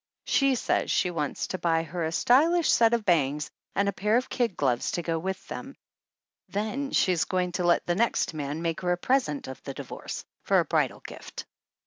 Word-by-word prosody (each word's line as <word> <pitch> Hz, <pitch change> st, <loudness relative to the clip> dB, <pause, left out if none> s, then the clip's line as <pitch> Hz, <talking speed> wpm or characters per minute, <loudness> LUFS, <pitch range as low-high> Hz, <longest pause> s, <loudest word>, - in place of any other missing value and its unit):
She 275 Hz, -1 st, +3 dB
says -, -, 0 dB
she 180 Hz, -, +2 dB
wants 150 Hz, -4 st, -2 dB
to 185 Hz, -, -3 dB
buy 165 Hz, -1 st, +1 dB
her 165 Hz, +2 st, -4 dB
a 160 Hz, -, -1 dB
stylish 310 Hz, -, +4 dB
set 230 Hz, 0 st, +5 dB
of 230 Hz, -3 st, -3 dB
bangs 150 Hz, -4 st, +1 dB, 0.2 s
and 200 Hz, -, +2 dB
a 200 Hz, -, 0 dB
pair 210 Hz, +4 st, +2 dB
of 255 Hz, -, -2 dB
kid 235 Hz, -7 st, -1 dB
gloves 125 Hz, -4 st, +1 dB
to 175 Hz, -, -2 dB
go 165 Hz, -1 st, -1 dB
with 190 Hz, +2 st, -4 dB
them, -, -, -7 dB, 0.7 s
then 220 Hz, +7 st, -2 dB
she 185 Hz, -, +3 dB
is 170 Hz, -3 st, +1 dB
going 180 Hz, -1 st, -1 dB
to 180 Hz, 0 st, -2 dB
let 175 Hz, 0 st, +3 dB
the 175 Hz, -, +1 dB
next 225 Hz, -2 st, +1 dB
man 150 Hz, +1 st, -4 dB
make 165 Hz, 0 st, -1 dB
her 180 Hz, -1 st, 0 dB
a -, -, -2 dB
pres 260 Hz, +7 st, +1 dB
ent 145 Hz, -1 st, -5 dB
of 130 Hz, -, -8 dB
the -, -, -7 dB
divorce -, -, -7 dB, 0.2 s
for -, -, +3 dB
a -, -, +3 dB
bridal -, -, 0 dB
gift. -, -, -9 dB
180 Hz, 215 wpm, -27 LUFS, 165-230 Hz, 0.7 s, set